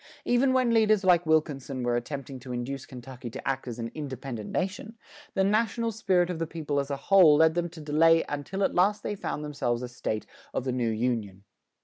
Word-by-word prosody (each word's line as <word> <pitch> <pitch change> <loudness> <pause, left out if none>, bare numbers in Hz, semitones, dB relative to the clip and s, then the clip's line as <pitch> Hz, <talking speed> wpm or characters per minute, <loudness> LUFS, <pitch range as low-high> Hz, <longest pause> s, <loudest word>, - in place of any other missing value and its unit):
Even 245 +2 +3
when 255 -2 +2
leaders 215 -2 +4
like 175 -2 +4
Wilkinson 140 -4 0
were 120 0 +1
attempting 135 +2 -5
to 125 0 -9
induce 125 +2 -4
Kentucky 125 -1 -9
to - - -8
act 135 -1 -2
as 120 -1 -5
an 115 -1 -5
independent 130 -6 -6
nation, 205 +4 -3 0.4
the 195 - +3
national 225 +3 +1
spirit 185 -5 +1
of 170 - -5
the 165 - -2
people 150 -3 -2
as 140 0 -3
a 140 - -2
whole 170 0 +6
led 160 +1 +5
them 175 0 -1
to 165 0 -12
delay 165 +2 +4
until 145 +7 -3
at - - +1
last 205 +3 +2
they - - -2
found 150 -6 -4
themselves 125 -5 -2
a - - -3
State 110 -3 -4 0.3
of - - 0
the 130 - -1
new 125 -2 0
Union. 110 -4 -2
150 Hz, 210 wpm, -27 LUFS, 125-190 Hz, 0.4 s, whole